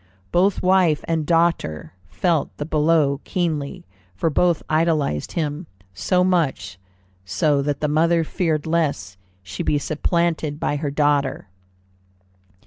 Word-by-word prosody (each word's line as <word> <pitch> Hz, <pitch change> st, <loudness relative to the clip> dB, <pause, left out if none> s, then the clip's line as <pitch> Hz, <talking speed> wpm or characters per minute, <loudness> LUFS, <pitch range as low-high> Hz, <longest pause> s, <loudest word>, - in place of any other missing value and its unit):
Both 185 Hz, +3 st, +2 dB
wife 180 Hz, -4 st, +3 dB
and 160 Hz, -2 st, -1 dB
daughter 165 Hz, -, 0 dB, 0.2 s
felt 170 Hz, -, -1 dB
the 145 Hz, -, -4 dB
blow 150 Hz, -2 st, +2 dB
keenly, 160 Hz, -6 st, -3 dB, 0.3 s
for 160 Hz, -, 0 dB
both 170 Hz, +1 st, +2 dB
idolized 155 Hz, -, 0 dB
him, 155 Hz, +1 st, -3 dB, 0.3 s
so 180 Hz, -, +1 dB
much 150 Hz, -, 0 dB, 0.4 s
so 140 Hz, -, +1 dB
that 145 Hz, 0 st, -2 dB
the 150 Hz, -, +1 dB
mother 165 Hz, +3 st, +2 dB
feared 160 Hz, -2 st, -1 dB
lest 145 Hz, -, -1 dB, 0.2 s
she 95 Hz, -, -6 dB
be 150 Hz, -3 st, +1 dB
supplanted 155 Hz, 0 st, -1 dB
by 145 Hz, -, -1 dB
her 145 Hz, 0 st, -2 dB
daughter. 140 Hz, -6 st, 0 dB
155 Hz, 125 wpm, -22 LUFS, 145-170 Hz, 0.4 s, wife